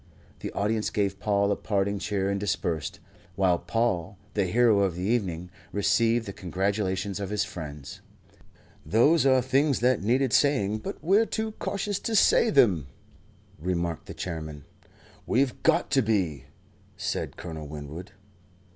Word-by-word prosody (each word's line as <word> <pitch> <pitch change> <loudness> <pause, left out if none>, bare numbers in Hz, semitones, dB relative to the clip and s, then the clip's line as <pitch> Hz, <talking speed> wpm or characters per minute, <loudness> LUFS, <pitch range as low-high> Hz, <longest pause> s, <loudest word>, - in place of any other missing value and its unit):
The - - -5
audience 105 +1 0
gave 100 -2 -1
Paul 100 -1 +1
a - - +2
parting 100 -1 -1
cheer 100 -1 -1
and 100 - -1
dispersed, 85 -5 -2 0.4
while 95 -3 +2
Paul, 100 -1 -1 0.2
the 100 -2 +1
hero 110 +2 +4
of 95 -4 +1
the 90 - -4
evening, 90 -6 -1 0.2
received 115 +3 +2
the 100 - -6
congratulations 95 +1 -2
of 100 -2 -4
his 105 0 0
friends. 75 -8 -8 0.8
"Those 140 +7 +4
are 130 -2 +4
things 135 +2 +2
that 125 -3 +3
needed 125 +5 +1
saying, 110 -8 +2
but - - -6
we're 200 +7 +4
too 220 0 -2
cautious 200 0 -2
to 225 - -2
say 225 +2 +5
them," 100 - +4 0.7
remarked 85 -1 -2
the - - -8
Chairman. 80 -5 -6 0.6
"We've 130 +1 +1
got - - +2
to 135 - +4
be," 90 - 0 0.5
said - - -3
Colonel 80 -3 -7
Winwood. 75 +4 -8
100 Hz, 145 wpm, -27 LUFS, 90-120 Hz, 0.8 s, say